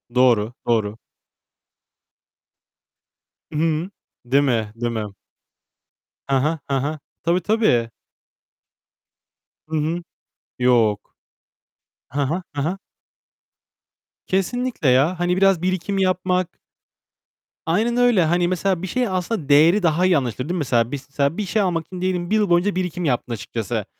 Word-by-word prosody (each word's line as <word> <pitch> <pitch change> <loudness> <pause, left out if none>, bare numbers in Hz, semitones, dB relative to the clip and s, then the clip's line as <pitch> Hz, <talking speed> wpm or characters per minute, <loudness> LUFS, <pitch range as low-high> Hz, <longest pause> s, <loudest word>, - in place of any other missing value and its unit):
Doğru, 120 -3 +3
doğru. 110 -2 +1 2.6
Hıı. 160 +3 0 0.4
Değil 140 +4 +3
mi? 115 -5 0
Değil 120 0 -2
mi? 110 -2 -2 1.3
He 135 - +3
he, 155 +3 0
he 135 -1 +1
he. 150 +3 -2 0.3
Tabii, 175 +2 +2
tabii. 165 - +2 1.8
Hı 160 - -4
hı. 160 +3 -1 0.6
Yok. 115 -4 +2 0.9
Hı 145 - -3
hı. 165 +7 -1
Hı 140 - 0
hı. 180 +6 -2 1.5
Kesinlikle 195 - 0
ya. 150 +8 +3
Hani 175 +1 +1
biraz 195 -3 +4
birikim 185 +1 -1
yapmak 185 -1 0 1.1
Aynen 220 +9 +1
öyle. 240 -7 +4
Hani 175 +2 +2
mesela 185 0 0
bir 190 - -4
şeyi 245 +3 -1
aslında 180 -4 -2
değeri 165 +7 +5
daha 170 +2 +2
iyi 180 -4 +4
anlaşılır 130 +3 -3
değil - - 0
mi? - - -1
Mesela, 120 -5 +1 0.5
bir 210 - -1
şey 215 +3 0
almak 170 -4 0
için 180 -1 -8
diyelim 180 -2 -1
bir 215 - +2
yıl 210 -3 +2
boyunca 175 +3 +2
birikim 180 -2 -2
yaptın 125 -3 -1
açıkçası. 115 -1 -4
170 Hz, 130 wpm, -21 LUFS, 130-185 Hz, 2.6 s, değeri